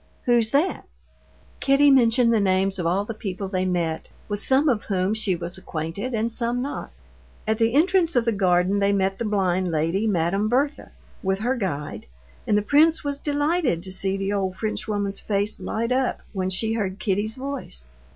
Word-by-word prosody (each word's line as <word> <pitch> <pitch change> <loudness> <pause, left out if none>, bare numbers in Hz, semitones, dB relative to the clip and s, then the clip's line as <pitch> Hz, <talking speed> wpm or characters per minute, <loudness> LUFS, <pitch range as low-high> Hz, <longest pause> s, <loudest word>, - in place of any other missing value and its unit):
Who's 235 -3 +3
that?" 295 +9 +1 0.7
Kitty 280 +1 +4
mentioned 235 -2 +4
the 225 - +3
names 190 0 +1
of 170 - 0
all 190 +4 +1
the 230 - -5
people 195 -2 -5
they 185 -1 -1
met, 170 -3 -1 0.2
with 205 -1 -3
some 270 +6 +3
of 235 -7 +2
whom 190 0 0
she 215 -4 0
was 175 +2 -6
acquainted 180 +9 -4
and 225 +1 0
some 235 +1 -1
not. 275 +3 -4 0.6
At 220 +1 0
the 230 +2 +2
entrance 345 +1 +3
of 240 -2 +3
the 230 - +2
garden 185 -1 +2
they 200 0 +2
met 195 -1 0
the 235 - -2
blind 190 -3 +1
lady, 165 +7 0
Madame 195 +2 +1
Berthe, 280 +5 0 0.3
with 190 0 0
her 250 +4 +1
guide, 150 - -4 0.4
and 210 - +3
the 210 - +1
prince 310 +6 +4
was 285 -1 -3
delighted 290 - 0
to 190 -1 -3
see 195 0 +1
the 195 +1 -2
old 190 -2 -1
Frenchwoman's 205 -2 -2
face 205 0 -1
light 230 +2 -2
up 255 0 0
when 185 -2 -1
she 220 +4 -1
heard 200 -4 -2
Kitty's 210 +1 -1
voice. 260 - -6
205 Hz, 185 wpm, -24 LUFS, 190-245 Hz, 0.7 s, Kitty